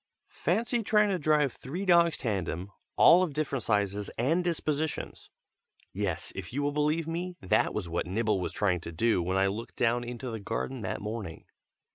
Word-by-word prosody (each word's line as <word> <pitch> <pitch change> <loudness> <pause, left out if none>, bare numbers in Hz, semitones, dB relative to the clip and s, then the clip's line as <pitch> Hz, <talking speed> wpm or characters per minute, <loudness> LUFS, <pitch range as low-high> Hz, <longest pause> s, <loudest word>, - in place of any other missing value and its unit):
Fancy 230 - +1
trying 210 -1 +3
to 190 -2 0
drive 150 -3 +2
three 170 +10 -5
dogs 170 -2 +5
tandem, 95 - -3 0.2
all 175 - +7
of 165 -7 -1
different 145 -4 -1
sizes 105 -1 0
and 160 +10 +2
dispositions! 155 -3 -2 0.6
Yes, 95 -3 -2
if 95 -3 -6
you 140 +4 -2
will 145 - +1
believe 150 +2 +1
me, 175 +2 -3
that 95 - +2
was 100 -5 -3
what 85 +1 -2
Nibble 105 0 0
was - - -2
trying 90 -4 +1
to 85 - -8
do 100 +3 +2
when 90 +2 -1
I 95 - +4
looked 105 +4 -4
down 120 +1 +1
into 120 +1 -5
the 110 - -4
garden 115 +4 -3
that 95 -1 -3
morning. 105 -5 -6
120 Hz, 180 wpm, -29 LUFS, 100-160 Hz, 0.6 s, all